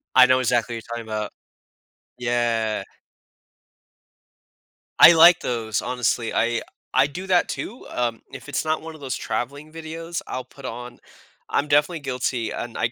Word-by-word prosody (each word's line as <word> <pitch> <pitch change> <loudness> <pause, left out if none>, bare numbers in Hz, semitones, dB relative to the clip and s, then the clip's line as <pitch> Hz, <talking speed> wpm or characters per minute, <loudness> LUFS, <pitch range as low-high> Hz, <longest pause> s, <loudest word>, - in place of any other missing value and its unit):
I 130 - +9
know 130 0 +4
exactly 120 -1 +1
what 115 - -7
you're 120 - -4
talking 115 - -7
'bout. 110 -1 -3 0.9
Yeah. 120 -3 0 2.2
I 170 - +11
like 170 +1 +8
those, 110 -3 -2
honestly. 125 -2 -1
I 115 +1 +1 0.3
I 130 +1 +5
do 180 +7 -7
that, 180 -2 +3
too, 240 +5 -6
um, 120 -2 -2
if - - -9
it's 145 - -2
not 155 0 0
one 160 0 -8
of - - -13
those 130 -5 -3
traveling 145 +9 -4
videos, 165 +1 -6
I'll 130 - -4
put 130 +2 -14
on 120 +1 -7 0.5
I'm 145 - +1
definitely 150 +3 +2
guilty, 125 -3 -2
and 120 - -5
I 115 - 0
125 Hz, 160 wpm, -23 LUFS, 115-155 Hz, 2.2 s, I